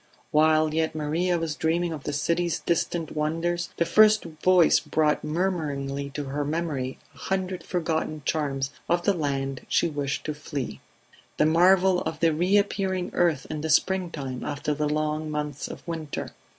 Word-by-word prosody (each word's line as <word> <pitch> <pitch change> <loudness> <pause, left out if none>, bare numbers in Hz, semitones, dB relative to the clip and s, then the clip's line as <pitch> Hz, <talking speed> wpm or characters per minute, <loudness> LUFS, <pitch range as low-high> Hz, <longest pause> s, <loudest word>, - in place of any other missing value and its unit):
While 155 0 +4
yet 160 0 0
Maria 165 +4 0
was 165 -2 -2
dreaming 165 +2 0
of 150 -3 -8
the - - -1
city's 170 +4 0
distant 170 -1 -1
wonders 165 +3 -1
the 170 - +2
first 215 +4 +5 0.2
voice 180 -3 +5
brought 155 -1 +1
murmuringly 150 -5 -2
to 150 - -2
her 140 +2 -3
memory 145 -4 -2 0.2
a 140 - -18
hundred 190 0 -2
forgotten 160 -3 -2
charms 135 -3 -1 0.2
of 175 0 +2
the 200 - +3
land 135 -5 -2
she 170 - +2
wished 145 -2 -3
to 155 - -2
flee. 145 -2 -5 0.6
The - - +4
marvel 180 +3 +4
of 160 0 -4
the 165 -1 +3
reappearing 190 +1 +1
earth 165 -6 +2
in 155 -1 -3
the 160 - -3
springtime 155 -7 0
after 150 +1 -2
the 150 0 -1
long 155 +1 -1
months 150 -2 -3
of - - -10
winter 160 -3 -4
155 Hz, 160 wpm, -26 LUFS, 150-175 Hz, 0.6 s, first